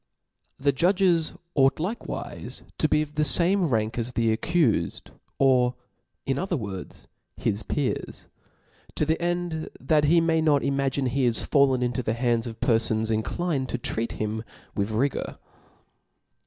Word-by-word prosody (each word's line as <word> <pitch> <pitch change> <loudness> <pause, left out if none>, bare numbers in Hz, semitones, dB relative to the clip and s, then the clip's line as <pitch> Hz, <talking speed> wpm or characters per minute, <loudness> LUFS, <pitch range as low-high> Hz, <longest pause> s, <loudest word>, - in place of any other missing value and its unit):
The 140 +1 +2
judges 175 +2 +2 0.2
ought 135 -1 +4
likewife 205 +9 -5 0.2
to 155 - +2
be 150 0 +3
of 150 -1 -10
the 150 - +1
fame 175 +7 +3
rank 115 -2 0
as 120 +2 -1
the 115 -2 +2
accufed^ 130 - 0 0.3
or 125 -2 +3 0.5
in 135 0 0
other 185 -2 -1
words, 100 -6 -7 0.3
his 100 - -1
peers; 140 +5 -3 0.7
to 155 - +1
the 160 +2 0
end 175 -2 -2
that 150 +2 +2
he 165 +3 +5
may 165 -1 +2
not 150 -3 +3
imagine 135 0 0
he 130 +1 +1
is 115 - 0
fallen 135 -3 +3
into 125 +1 -1
the 110 -2 -1
hands 120 -1 +1
of 115 -1 -8
perfons 110 -1 +1
inclined 130 +5 -1
to - - -2
treat 115 -1 -3
him 110 +1 -3 0.3
with 100 +1 -1
rigour. 125 +6 -1
135 Hz, 150 wpm, -26 LUFS, 115-160 Hz, 0.7 s, he